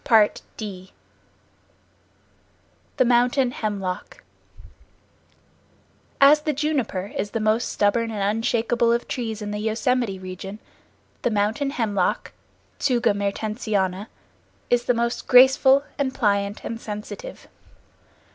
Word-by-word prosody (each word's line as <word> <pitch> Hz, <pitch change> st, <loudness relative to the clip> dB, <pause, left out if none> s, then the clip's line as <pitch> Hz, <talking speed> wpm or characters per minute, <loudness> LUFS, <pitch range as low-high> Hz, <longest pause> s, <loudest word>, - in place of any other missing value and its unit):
The 210 Hz, -3 st, 0 dB, 2.1 s
Mountain 245 Hz, +2 st, +3 dB
Hemlock 195 Hz, -6 st, -4 dB, 2.0 s
As 290 Hz, +2 st, +7 dB
the 305 Hz, 0 st, -1 dB
juniper 265 Hz, -10 st, -2 dB
is 205 Hz, -, -2 dB
the 225 Hz, -, -3 dB
most 215 Hz, +2 st, +1 dB
stubborn 225 Hz, +3 st, +1 dB
and 205 Hz, 0 st, -1 dB
unshakeable 230 Hz, +1 st, +1 dB
of 235 Hz, +1 st, 0 dB
trees 225 Hz, -3 st, -4 dB
in 205 Hz, -, -4 dB
the 210 Hz, -, -3 dB
Yosemite 220 Hz, 0 st, 0 dB
region, 185 Hz, +2 st, -8 dB, 0.6 s
the -, -, +1 dB
Mountain 220 Hz, +6 st, 0 dB
Hemlock 210 Hz, -9 st, -1 dB, 0.5 s
(Tsuga 240 Hz, -5 st, +2 dB
Mertensiana) 200 Hz, -1 st, -2 dB, 0.6 s
is 245 Hz, 0 st, +2 dB
the 245 Hz, -, +2 dB
most 235 Hz, +1 st, -2 dB
graceful 265 Hz, +2 st, +6 dB, 0.2 s
and 265 Hz, -2 st, -1 dB
pliant 200 Hz, -3 st, 0 dB
and 230 Hz, 0 st, -5 dB
sensitive. 215 Hz, -, -8 dB
225 Hz, 100 wpm, -23 LUFS, 205-245 Hz, 2.1 s, As